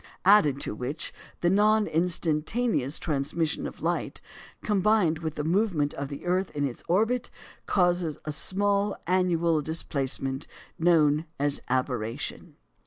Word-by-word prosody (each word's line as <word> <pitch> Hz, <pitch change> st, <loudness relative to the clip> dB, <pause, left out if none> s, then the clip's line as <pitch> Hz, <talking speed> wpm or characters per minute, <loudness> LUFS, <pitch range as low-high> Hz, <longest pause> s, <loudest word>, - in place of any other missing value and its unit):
Added 185 Hz, -9 st, +5 dB
to -, -, -1 dB
which, 125 Hz, +7 st, -5 dB, 0.3 s
the 175 Hz, -, +3 dB
non 210 Hz, +2 st, +4 dB
instantaneous 165 Hz, -, 0 dB
transmission 150 Hz, +1 st, -1 dB
of -, -, -11 dB
light, -, -, -1 dB, 0.4 s
combined 205 Hz, -5 st, +2 dB
with 160 Hz, -2 st, -4 dB
the 150 Hz, -, -2 dB
movement 165 Hz, -4 st, +1 dB
of 140 Hz, 0 st, -4 dB
the 140 Hz, +3 st, -8 dB
earth 185 Hz, +2 st, +1 dB
in 145 Hz, -1 st, 0 dB
its 130 Hz, -4 st, -5 dB
orbit, 225 Hz, +7 st, +1 dB, 0.4 s
causes 175 Hz, -5 st, +1 dB
a 155 Hz, -, -2 dB
small 200 Hz, +5 st, +1 dB
annual 170 Hz, -3 st, +2 dB
displacement 135 Hz, -3 st, -2 dB, 0.3 s
known 160 Hz, -2 st, +3 dB
as 145 Hz, 0 st, +1 dB
aberration. 125 Hz, -3 st, -2 dB
165 Hz, 125 wpm, -27 LUFS, 145-190 Hz, 0.4 s, Added